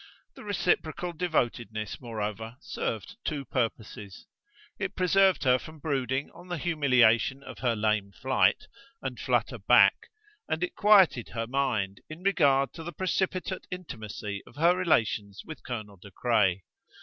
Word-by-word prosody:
The - - -12
reciprocal 180 -4 -1
devotedness, 120 - -2
moreover, 110 0 -5
served 110 - -4
two 145 -3 -3
purposes: 110 -5 -4 0.5
it - - -3
preserved 190 -1 +3
her 130 -1 +4
from 155 +4 -11
brooding 135 -2 -2
on 175 +1 -14
the 175 -1 -3
humiliation 135 -5 +3
of - - -10
her 120 -3 +1
lame 105 -2 0
flight, 130 +6 +1 0.4
and - - -4
flutter - - 0
back, - - +5 0.4
and 160 +2 -1
it 180 - -2
quieted 195 - +5
her 115 0 -1
mind 115 -7 -1
in 155 +3 -9
regard 140 -8 +3
to 165 - -8
the 175 - -6
precipitate 185 +2 -2
intimacy 110 - -6
of - - -16
her 170 +4 +4
relations 110 - 0
with 155 - -9
Colonel 110 -5 -6
De 95 +3 -13
Craye. 95 -4 +1
130 Hz, 140 wpm, -28 LUFS, 110-170 Hz, 0.5 s, back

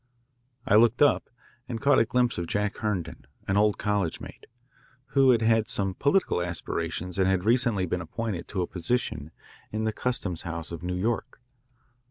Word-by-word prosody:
I 105 - +5
looked 120 +4 +5
up 145 - +3 0.4
and 115 -2 -3
caught 140 +4 +4
a 115 - +4
glimpse 125 -3 +1
of 85 - -3
Jack 105 +1 -1
Herndon, 105 -6 -3 0.2
an 95 - +1
old 105 0 +3
college 100 -5 -1
mate, - - -11 0.6
who 135 -2 +4
had 115 -3 +4
had 110 -1 +3
some 95 -1 -1
political 140 - +1
aspirations 85 +1 -3
and 95 - +3
had 95 0 +1
recently 115 -4 +2
been 90 +1 -2
appointed 95 +2 -4
to 95 -3 -2
a - - -1
position 85 - -2 0.4
in 110 +1 -2
the 110 0 0
customs 105 -9 -1
house 85 -1 -5
of 85 -2 -6
New 90 0 -3
York. 110 +6 -2
105 Hz, 175 wpm, -27 LUFS, 90-115 Hz, 0.6 s, I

